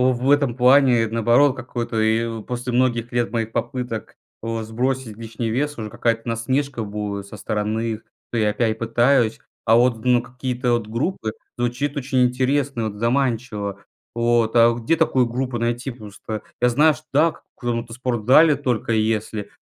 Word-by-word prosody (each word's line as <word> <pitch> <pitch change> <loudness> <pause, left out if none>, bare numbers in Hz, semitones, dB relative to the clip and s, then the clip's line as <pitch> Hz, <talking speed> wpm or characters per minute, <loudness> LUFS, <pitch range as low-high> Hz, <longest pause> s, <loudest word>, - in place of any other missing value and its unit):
в 125 0 +1
этом 140 -5 +2
плане 125 -2 +5
наоборот, 120 +5 +3
какой-то 120 -3 -3
и 110 0 0
после 125 +2 -4
многих 120 -1 +1
лет 120 -1 0
моих 115 -1 -2
попыток, 125 -4 -4 0.3
э, 115 0 -3
сбросить 120 0 -2
лишний 115 0 -4
вес, 145 +5 -1
уже 110 -1 -5
какая-то 115 0 0
насмешка 120 +2 -1
будет 100 -1 -4
со 105 - -9
стороны 110 +2 -2
их. 110 - -6 0.3
То 120 - 0
я 105 -1 +2
опять 110 0 0
пытаюсь, 120 0 +2 0.3
а 115 0 +5
вот, 120 -2 +2
ну, 125 -1 +4
какие-то 125 0 -2
от 115 -3 -2
группы- 115 - -2 0.2
звучит 125 +4 -2
очень 130 -2 +1
интересно, 130 -1 0
вот 105 - -8
заманчиво. 115 -5 -1 0.3
Вот, 120 -1 +1
а 115 0 +6
где 120 +8 0
такую 130 -6 +2
группу 125 +1 -3
найти? 120 +3 -2
Просто 110 -1 -8 0.2
я 125 - +4
знаю, 150 +6 +4
что - - -14
дак 155 +3 +2
в - - -33
каком-то 115 -1 -3
спортзале 130 +5 +4
только 125 -6 -2
если 110 -1 -1
120 Hz, 160 wpm, -22 LUFS, 115-130 Hz, 0.3 s, а